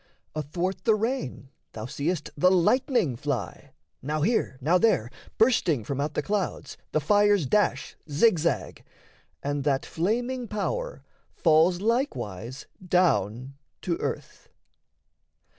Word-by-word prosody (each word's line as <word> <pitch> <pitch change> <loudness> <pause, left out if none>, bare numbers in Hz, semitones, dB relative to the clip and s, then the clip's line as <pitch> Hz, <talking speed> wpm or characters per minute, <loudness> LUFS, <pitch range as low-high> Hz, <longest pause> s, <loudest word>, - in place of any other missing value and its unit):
Athwart 170 +6 -3
the 220 -2 +5
rain 215 - -3 0.2
thou 110 -1 -6
seest 150 +5 -3
the 180 +5 +4
lightning 190 - +2
fly; 140 0 -4 0.3
Now 150 +3 -2
here, 220 - +1
now 165 +7 +3
there, 125 - +2 0.3
bursting 185 - +3
from 140 +5 -3
out 150 +1 -3
the - - 0
clouds, 205 -2 -2 0.2
The 155 - +2
fires 205 +2 +3
dash 205 +10 +1
zig 175 +5 +4
zag 165 +2 -2 0.6
and 145 0 -2
that 135 -2 +1
flaming 240 +8 -1
power - - -3 0.3
Falls 170 +2 +3
likewise 135 - -2 0.2
down 135 - +1 0.3
to 175 -3 0
earth. - - -5
170 Hz, 120 wpm, -26 LUFS, 140-210 Hz, 0.6 s, the